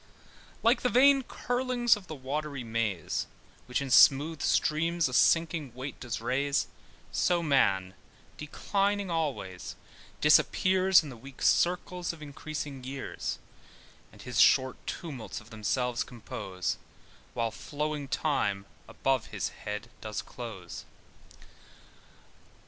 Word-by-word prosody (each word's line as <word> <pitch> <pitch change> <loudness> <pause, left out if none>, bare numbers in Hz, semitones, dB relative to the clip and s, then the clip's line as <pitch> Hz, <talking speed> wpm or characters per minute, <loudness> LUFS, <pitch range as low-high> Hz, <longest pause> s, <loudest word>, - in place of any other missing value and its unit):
] - - -24
LIKE 230 +3 +4
the 250 - +2
vain 270 +3 +6
curlings 245 -1 +1
of 200 -3 -11
the 155 - -6
watery 140 0 -4
maze, 110 -6 -2 0.4
Which 125 +2 -1
in 135 - -5
smooth 145 +4 +6
streams 165 +1 +2
a 125 - -6
sinking 155 -3 +2
weight 130 +2 -6
does 120 -3 -4
raise, 140 +5 0 0.5
So 175 -1 +1
Man, 95 - +2 0.4
declining 200 +5 -1
always, 140 - -3 0.4
disappears 185 +4 +5
In 150 - -7
the 130 - -9
weak 135 +3 -10
circles 180 0 +1
of 165 - -13
increasing 145 -2 -6
years; 135 +1 -4 0.7
And - - -14
his - - +1
short 130 0 +5
tumults 140 -9 -5
of 110 +2 -17
themselves 120 +3 -1
compose, 100 -6 -5 0.6
While 115 -2 0
flowing 150 +3 -4
Time 100 -10 0 0.2
above 135 -3 0
his - - -3
head 105 +3 -7
does 110 -1 -4
close. 105 -8 -8
140 Hz, 120 wpm, -29 LUFS, 120-170 Hz, 0.7 s, vain